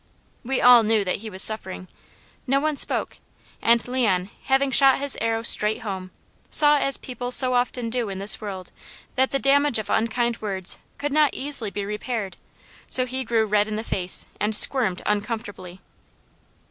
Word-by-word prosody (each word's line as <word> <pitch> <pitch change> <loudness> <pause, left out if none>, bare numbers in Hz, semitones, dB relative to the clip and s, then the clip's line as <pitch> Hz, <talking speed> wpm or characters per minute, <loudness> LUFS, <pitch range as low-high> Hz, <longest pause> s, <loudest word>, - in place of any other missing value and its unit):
We 260 +2 -2
all 245 -1 +7
knew 220 -1 0
that 180 - -2
he 220 +2 -9
was 190 -2 -1
suffering. 190 -4 -1 0.6
No 270 +2 +2
one 305 +1 -2
spoke, - - -1 0.4
and 235 +1 +2
Leon 205 -7 -1
having 270 0 +1
shot 270 0 +5
his 280 -1 +2
arrow 225 0 -2
straight 215 -2 +3
home, 190 -3 -6 0.4
saw 295 -1 +7
as 275 0 +1
people 245 -1 -7
so 255 0 +4
often 245 -1 -2
do 240 -3 -1
in 195 - -6
this 200 +2 0
world 195 -3 -8 0.4
that 265 0 +1
the 275 - -1
damage 280 -1 +2
of 215 -2 -5
unkind 230 +1 -1
words 190 -4 0 0.2
could 290 -1 -4
not 300 -2 +2
easily 270 -6 -3
be 200 0 -6
repaired; 210 -1 -5 0.5
so 255 - +3
he 260 +1 -4
grew 225 -2 0
red 210 0 +1
in 215 - -5
the 220 - -4
face 185 -5 -3
and 210 +1 -1
squirmed 215 -6 +2
uncomfortably. 205 -3 -5
230 Hz, 170 wpm, -22 LUFS, 205-260 Hz, 0.6 s, all